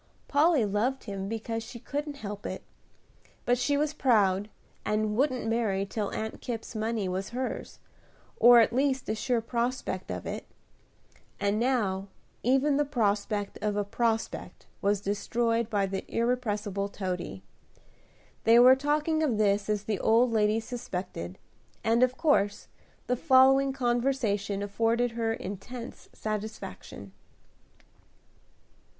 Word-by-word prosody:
Polly 295 Hz, -4 st, +4 dB
loved 220 Hz, +7 st, 0 dB
him 195 Hz, -2 st, -5 dB
because 225 Hz, 0 st, -3 dB
she 225 Hz, +2 st, -9 dB
couldn't 290 Hz, +4 st, -4 dB
help 205 Hz, -6 st, -7 dB
it; -, -, -5 dB, 0.8 s
but 245 Hz, -, +4 dB
she 285 Hz, +3 st, +1 dB
was 300 Hz, +1 st, 0 dB
proud, 205 Hz, -8 st, +2 dB, 0.3 s
and 210 Hz, 0 st, 0 dB
wouldn't 255 Hz, -1 st, +1 dB
marry 220 Hz, -4 st, 0 dB
till 205 Hz, +1 st, -3 dB
Aunt 220 Hz, 0 st, -5 dB
Kipp's 235 Hz, -3 st, -5 dB
money 220 Hz, -2 st, -1 dB
was 185 Hz, +1 st, -3 dB
hers, 255 Hz, +2 st, -4 dB, 0.6 s
or 240 Hz, 0 st, +8 dB
at 225 Hz, -, +3 dB
least 265 Hz, 0 st, +1 dB
a -, -, +1 dB
sure 230 Hz, +2 st, 0 dB
prospect 235 Hz, -5 st, -2 dB
of -, -, -4 dB
it; -, -, -5 dB, 0.9 s
and 205 Hz, +1 st, +1 dB
now 210 Hz, -6 st, 0 dB, 0.3 s
even 270 Hz, +3 st, +3 dB
the 295 Hz, -, +3 dB
prospect 210 Hz, -6 st, -1 dB
of 210 Hz, -1 st, 0 dB
a 205 Hz, -, +1 dB
prospect 225 Hz, +2 st, -2 dB, 0.2 s
was 200 Hz, 0 st, +1 dB
destroyed 230 Hz, +3 st, 0 dB
by 205 Hz, -3 st, +1 dB
that 195 Hz, 0 st, -5 dB
irrepressible 210 Hz, -5 st, -1 dB
Toady. 180 Hz, -, -4 dB, 1.0 s
They 230 Hz, +1 st, +6 dB
were 250 Hz, +2 st, +8 dB
talking 300 Hz, +3 st, 0 dB
of 270 Hz, -9 st, +1 dB
this 205 Hz, -1 st, +2 dB
as 210 Hz, -1 st, 0 dB
the 210 Hz, -3 st, -2 dB
old 230 Hz, +2 st, +4 dB
lady 215 Hz, 0 st, +2 dB
suspected, 185 Hz, -, -6 dB, 0.5 s
and 230 Hz, +2 st, +3 dB
of 255 Hz, 0 st, +3 dB
course 205 Hz, -11 st, +1 dB, 0.4 s
the 250 Hz, -, +1 dB
following 270 Hz, 0 st, +5 dB
conversation 240 Hz, -6 st, 0 dB
afforded 230 Hz, +4 st, +1 dB
her 230 Hz, -1 st, -1 dB
intense 225 Hz, +4 st, -7 dB
satisfaction. 210 Hz, -, -6 dB
225 Hz, 130 wpm, -28 LUFS, 205-250 Hz, 1.0 s, or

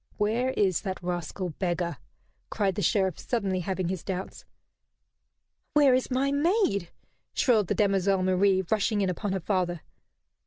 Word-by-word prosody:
"Where 225 Hz, +5 st, +1 dB
is 190 Hz, -4 st, +1 dB
that 190 Hz, -3 st, -3 dB
rascal 175 Hz, +1 st, -3 dB
beggar?" 175 Hz, -1 st, -1 dB, 0.5 s
cried 200 Hz, -3 st, 0 dB
the 205 Hz, -, -3 dB
Sheriff, 190 Hz, -3 st, +1 dB
suddenly 200 Hz, -6 st, -1 dB
having 185 Hz, 0 st, -2 dB
his 185 Hz, -3 st, -4 dB
doubts. 190 Hz, -1 st, -5 dB, 1.3 s
"Where 285 Hz, -3 st, +5 dB
is 255 Hz, 0 st, +1 dB
my 270 Hz, +2 st, +1 dB
maid?" 285 Hz, -, +1 dB, 0.5 s
shrilled 220 Hz, -7 st, +3 dB
the -, -, 0 dB
demoiselle 195 Hz, -2 st, +2 dB
Marie, 185 Hz, +1 st, +3 dB
rushing 215 Hz, 0 st, +1 dB
in 190 Hz, -2 st, +1 dB
upon 195 Hz, +3 st, -3 dB
her 190 Hz, -, -1 dB
father. 175 Hz, -2 st, -1 dB
195 Hz, 145 wpm, -27 LUFS, 185-215 Hz, 1.3 s, Where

